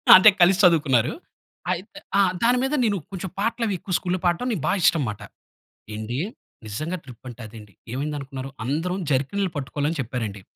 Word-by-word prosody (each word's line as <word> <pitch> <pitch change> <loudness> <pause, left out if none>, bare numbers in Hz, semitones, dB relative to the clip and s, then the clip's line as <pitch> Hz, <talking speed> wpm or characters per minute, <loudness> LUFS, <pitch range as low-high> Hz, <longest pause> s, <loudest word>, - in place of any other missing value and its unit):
అంటే 190 +3 +9
కలిసి 180 +2 +6
చదువుకున్నారు. 145 -9 +4 0.6
అయితే 185 +4 -5 0.2
ఆ! - - +6 0.2
దాని 245 +2 +4
మీద 270 +2 -1
నేను 210 -4 +2
కొంచెం 190 0 -5
పాటలు 230 +3 0
అవి 205 - 0
ఎక్కువ 185 - -5
స్కూల్‌లో 185 +1 -2
పాడటం 175 +8 +1
నాకు 200 -9 -2
బా - - +3
ఇష్టంమాట. 135 - +2 0.7
ఏండి, 110 +4 -4 0.5
నిజంగా 155 - -3
ట్రిప్ 125 -3 -13
అంటే 125 0 -10
అదండి. 105 -2 -13 0.2
ఏమైందనుకున్నారు? 135 -1 -4 0.2
అందరం 165 +8 -1
జర్కిన్‌లు 165 +9 +1
పట్టుకోవాలని 145 +3 -2
చెప్పారండి. 115 -5 -4
150 Hz, 155 wpm, -24 LUFS, 125-185 Hz, 0.7 s, అంటే